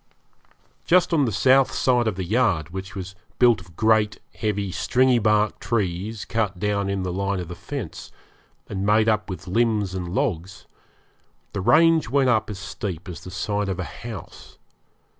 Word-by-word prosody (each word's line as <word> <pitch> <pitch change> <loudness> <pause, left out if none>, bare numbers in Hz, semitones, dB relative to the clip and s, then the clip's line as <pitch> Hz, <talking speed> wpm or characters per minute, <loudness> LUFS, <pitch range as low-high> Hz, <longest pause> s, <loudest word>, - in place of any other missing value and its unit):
Just 180 0 +3
on 150 -4 +3
the 115 - -1
south 130 +7 +4
side 125 -2 +2
of 110 - 0
the 95 - -3
yard, 95 -6 +1
which 95 +2 -7
was 95 0 -6 0.2
built 120 -5 +4
of 85 -2 -17
great 110 0 +2
heavy 100 -3 -2
stringy 125 +5 +2
bark 105 -1 +2
trees 105 -1 -2
cut 105 -5 -1
down 100 +1 -1
in 100 -1 -1
the 90 -1 -3
line 100 +1 -1
of 90 -2 -6
the 90 - -6
fence, - - -7 0.6
and 95 -1 -4
made 105 +2 +3
up 105 -1 +1
with 95 0 -6
limbs 105 -1 +1
and 90 -2 -4
logs, 90 +1 -2 0.9
the 100 - -2
range 165 - +4
went 135 0 +3
up 110 -3 +2
as 105 - -5
steep 95 -1 -6
as 90 - -8
the - - -8
side 100 +2 -2
of 95 -1 -3
a - - -1
house. 115 +1 -9
105 Hz, 175 wpm, -23 LUFS, 95-115 Hz, 0.9 s, south